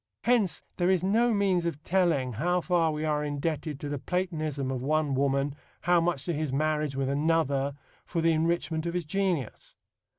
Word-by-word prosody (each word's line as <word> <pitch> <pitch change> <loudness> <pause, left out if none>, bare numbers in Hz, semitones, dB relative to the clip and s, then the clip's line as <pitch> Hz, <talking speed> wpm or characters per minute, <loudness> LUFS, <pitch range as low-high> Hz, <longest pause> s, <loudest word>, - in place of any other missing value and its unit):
Hence 235 -7 +2
there 175 0 +2
is 185 -2 +2
no 230 +5 +3
means 190 -5 +2
of 155 -2 -4
telling 165 -9 +1
how 175 +10 +1
far 170 -2 +2
we 155 +1 -3
are 150 -1 0
indebted 150 0 -3
to 145 - -4
the 145 -1 -3
Platonism 155 -6 -2
of 130 -2 -3
one 150 +1 +1
woman, 140 +1 +1 0.3
how 175 0 +3
much 165 -5 -1
to 175 - -1
his 155 -2 -2
marriage 150 0 0
with 135 -1 -1
another, 140 -1 +1 0.3
for 170 - -3
the 165 0 +3
enrichment 165 0 0
of 170 - -3
his 175 -2 -1
genius. 180 - -2
155 Hz, 185 wpm, -28 LUFS, 145-175 Hz, 0.3 s, no